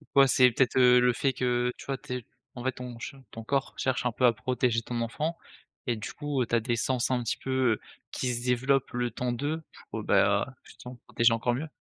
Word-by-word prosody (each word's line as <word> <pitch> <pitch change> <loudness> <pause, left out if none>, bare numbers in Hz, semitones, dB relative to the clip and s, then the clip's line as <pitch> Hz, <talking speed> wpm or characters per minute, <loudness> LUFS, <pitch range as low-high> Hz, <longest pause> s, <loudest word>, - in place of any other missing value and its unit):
Ouais 135 -1 +7
c'est 125 -1 +5
peut-être, 130 +2 +1
heu, 125 -1 +7
le 125 0 +4
fait 135 +2 0
que, 130 - -5 0.2
heu, 125 - -2
tu - - -11
vois? 135 -1 -2
Tu 125 - -7
es 120 - -10 0.3
en 120 - -7
fait 130 - +1
ton 125 -1 -8
che 120 - -7
ton 115 - -9
corps 135 +3 -1
cherche 130 -1 -1
un 125 - +2
peu 125 +2 +1
à 120 - +6
protéger 125 0 0
ton 120 0 -4
enfant, 155 +8 -2 0.5
et 120 -2 0
du 110 - -6
coup, 145 -3 -2
heu, - - +2
tu 120 - +1
as - - +4
des 120 +1 -1
sens 125 +2 0
un 125 -1 +1
petit 115 - -1
peu, 130 -3 +1
heu, - - -4 0.3
qui 125 -1 -2
se 120 0 -3
développent 130 +2 +1
le 120 0 -1
temps 125 -1 -2
de, 145 +6 -2 0.3
pour 110 -1 -4
bah 100 0 +3
heu, 130 - -10
justement 125 0 -11
protéger 115 0 +3
encore 120 +1 0
mieux. 150 +6 -3
125 Hz, 255 wpm, -28 LUFS, 115-130 Hz, 0.5 s, Ouais